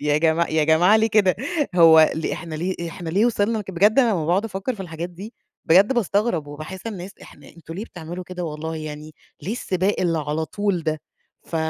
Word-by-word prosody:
يا 150 Hz, 0 st, +1 dB
جماع 165 Hz, +1 st, +2 dB
يا 155 Hz, -1 st, +2 dB
جماعة 175 Hz, +7 st, +5 dB
ليه 220 Hz, 0 st, +3 dB
كده؟! 205 Hz, -4 st, +3 dB, 0.4 s
هو 160 Hz, -2 st, +7 dB
ل 160 Hz, -, -3 dB
إحنا 165 Hz, 0 st, -6 dB
ليه؟! 170 Hz, +1 st, -3 dB
إحنا 165 Hz, -1 st, -6 dB
ليه 205 Hz, +7 st, +3 dB
وصلنا 220 Hz, -1 st, 0 dB
بجد 200 Hz, +6 st, +3 dB
أنا 240 Hz, -4 st, +4 dB
أمّا 165 Hz, -6 st, -1 dB
باقعد 185 Hz, +6 st, +1 dB
أفكّر 225 Hz, +3 st, -3 dB
في 200 Hz, -, -11 dB
الحاجات 170 Hz, -1 st, -6 dB
دي 200 Hz, +7 st, -10 dB, 0.3 s
بجد 195 Hz, +9 st, +5 dB
باستغرب، 205 Hz, -7 st, 0 dB
وباحس 155 Hz, +7 st, -8 dB
الناس، 195 Hz, -4 st, -6 dB
إحنا -, -, -15 dB
أنتم 165 Hz, -1 st, -12 dB
ليه 205 Hz, +5 st, -5 dB
بتعملوا 175 Hz, -2 st, -8 dB
كده! 180 Hz, -1 st, -6 dB
والله 160 Hz, 0 st, -5 dB
يعني، 155 Hz, 0 st, -8 dB, 0.3 s
ليه 200 Hz, -, -3 dB
السباق 190 Hz, -3 st, -1 dB
اللي 170 Hz, -3 st, +1 dB
على 150 Hz, +1 st, -2 dB
طول 200 Hz, -1 st, -2 dB
ده؟ 155 Hz, -1 st, -2 dB, 0.4 s
ف 165 Hz, -, -5 dB
175 Hz, 200 wpm, -22 LUFS, 160-200 Hz, 0.4 s, هو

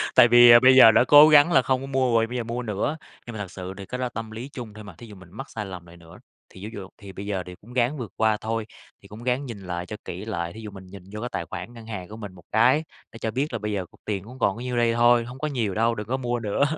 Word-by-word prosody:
tại 120 Hz, -, +8 dB
vì, 120 Hz, 0 st, +8 dB
à, 120 Hz, -, +9 dB
bây 130 Hz, +1 st, +6 dB
giờ 115 Hz, -4 st, +9 dB
đã -, -, +4 dB
cố 150 Hz, +3 st, +8 dB
gắng 150 Hz, +3 st, +6 dB
là 135 Hz, -, +5 dB
không 130 Hz, 0 st, 0 dB
có 135 Hz, -, -7 dB
mua 130 Hz, -3 st, 0 dB
rồi, 115 Hz, 0 st, +3 dB
bây 125 Hz, +1 st, -5 dB
giờ 120 Hz, -, -2 dB
mua 120 Hz, +2 st, -4 dB
nữa. 110 Hz, +8 st, -2 dB, 0.3 s
Nhưng 120 Hz, -, -7 dB
mà -, -, -6 dB
thật 100 Hz, -3 st, -6 dB
sự 95 Hz, 0 st, -7 dB
thì 100 Hz, -, -8 dB
cái 125 Hz, -, -6 dB
đó 130 Hz, -, -2 dB
là -, -, -3 dB
tâm 110 Hz, -1 st, -7 dB
lý 120 Hz, +5 st, -7 dB
chung 115 Hz, -5 st, -8 dB
thôi 110 Hz, 0 st, -11 dB
mà, 100 Hz, -4 st, -11 dB
thí 120 Hz, -, -12 dB
dụ 105 Hz, -, -12 dB
mình 95 Hz, -2 st, -15 dB
mắc 135 Hz, +7 st, -9 dB
sai 105 Hz, -2 st, -6 dB
lầm 90 Hz, -3 st, -9 dB
lại 85 Hz, 0 st, -15 dB
nữa, 85 Hz, +1 st, -15 dB, 0.3 s
thì 95 Hz, -, -13 dB
ví 110 Hz, -, -7 dB
dụ 100 Hz, -3 st, -8 dB
thì 100 Hz, -1 st, -11 dB
bây 100 Hz, +1 st, -8 dB
giờ 95 Hz, -3 st, -3 dB
thì 90 Hz, 0 st, -10 dB
cũng 120 Hz, +4 st, -15 dB
ráng 130 Hz, +4 st, 0 dB
vượt 115 Hz, -6 st, -7 dB
qua 110 Hz, -1 st, +2 dB
thôi, 115 Hz, 0 st, -3 dB, 0.4 s
thì -, -, -16 dB
cũng 110 Hz, +3 st, -11 dB
ráng 125 Hz, +3 st, -1 dB
nhìn 115 Hz, -5 st, -8 dB
lại 90 Hz, -2 st, -5 dB
cho 105 Hz, -, -7 dB
kỹ 95 Hz, +4 st, -7 dB
lại, 85 Hz, -6 st, -4 dB
thí 110 Hz, -, -10 dB
dụ 105 Hz, -2 st, -8 dB
mình 95 Hz, -1 st, -12 dB
nhìn 95 Hz, -1 st, -12 dB
vô 105 Hz, -, -5 dB
cái 120 Hz, -, -4 dB
tài 85 Hz, -, -4 dB
khoản 95 Hz, +7 st, -8 dB
ngân 115 Hz, -2 st, -12 dB
hàng 95 Hz, -5 st, -6 dB
của 110 Hz, -, -9 dB
mình 105 Hz, -4 st, -8 dB
một 90 Hz, -2 st, -16 dB
cái, 130 Hz, +7 st, +3 dB, 0.3 s
để 115 Hz, -, -12 dB
cho 110 Hz, -, -3 dB
biết 135 Hz, +5 st, -2 dB
là 115 Hz, -, -2 dB
bây 105 Hz, 0 st, -4 dB
giờ 95 Hz, -3 st, -3 dB
cục -, -, -24 dB
tiền 100 Hz, -3 st, -3 dB
cũng 125 Hz, +5 st, -13 dB
còn 100 Hz, -5 st, +1 dB
có 115 Hz, -, -9 dB
nhiêu 125 Hz, -1 st, -3 dB
đây 120 Hz, -1 st, +2 dB
thôi, 120 Hz, 0 st, +4 dB
hông 125 Hz, +2 st, -10 dB
có 150 Hz, -, -2 dB
nhiều 120 Hz, -9 st, -2 dB
đâu, 115 Hz, +1 st, +1 dB
đừng 105 Hz, -1 st, -6 dB
có 130 Hz, +3 st, -1 dB
mua 120 Hz, -2 st, -2 dB
nữa. 110 Hz, +4 st, -1 dB
115 Hz, 335 wpm, -24 LUFS, 100-125 Hz, 0.4 s, à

